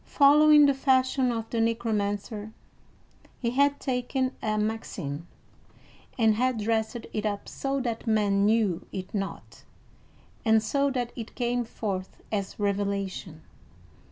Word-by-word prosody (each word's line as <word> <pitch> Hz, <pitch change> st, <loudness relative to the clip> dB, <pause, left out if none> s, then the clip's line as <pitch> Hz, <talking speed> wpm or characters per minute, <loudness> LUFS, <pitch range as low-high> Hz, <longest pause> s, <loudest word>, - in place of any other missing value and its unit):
Following 295 Hz, +1 st, +6 dB
the 280 Hz, -, +4 dB
fashion 260 Hz, -1 st, +2 dB
of 225 Hz, -1 st, -3 dB
the 230 Hz, -, 0 dB
Necromancer, 215 Hz, -1 st, -1 dB, 0.9 s
he 235 Hz, -2 st, -1 dB
had 280 Hz, +2 st, +2 dB
taken 255 Hz, 0 st, -1 dB
a 215 Hz, -1 st, 0 dB
maxim, 190 Hz, -8 st, -3 dB, 0.9 s
and 225 Hz, -3 st, +4 dB
had 250 Hz, +2 st, +1 dB
dressed 220 Hz, +2 st, 0 dB, 0.2 s
it 215 Hz, -, -2 dB
up 205 Hz, -2 st, -3 dB
so 275 Hz, 0 st, -2 dB
that 235 Hz, -2 st, -4 dB
men 205 Hz, -2 st, +2 dB
knew 210 Hz, -5 st, +1 dB
it 185 Hz, -1 st, -6 dB
not, 195 Hz, -2 st, -5 dB, 0.8 s
and 220 Hz, -2 st, +4 dB
so 280 Hz, +5 st, +1 dB
that 250 Hz, -3 st, -2 dB
it 230 Hz, -3 st, -8 dB
came 245 Hz, 0 st, 0 dB
forth 195 Hz, -5 st, -5 dB
as 200 Hz, -2 st, -3 dB
revelation. 200 Hz, -5 st, -2 dB
225 Hz, 125 wpm, -27 LUFS, 205-255 Hz, 0.9 s, Following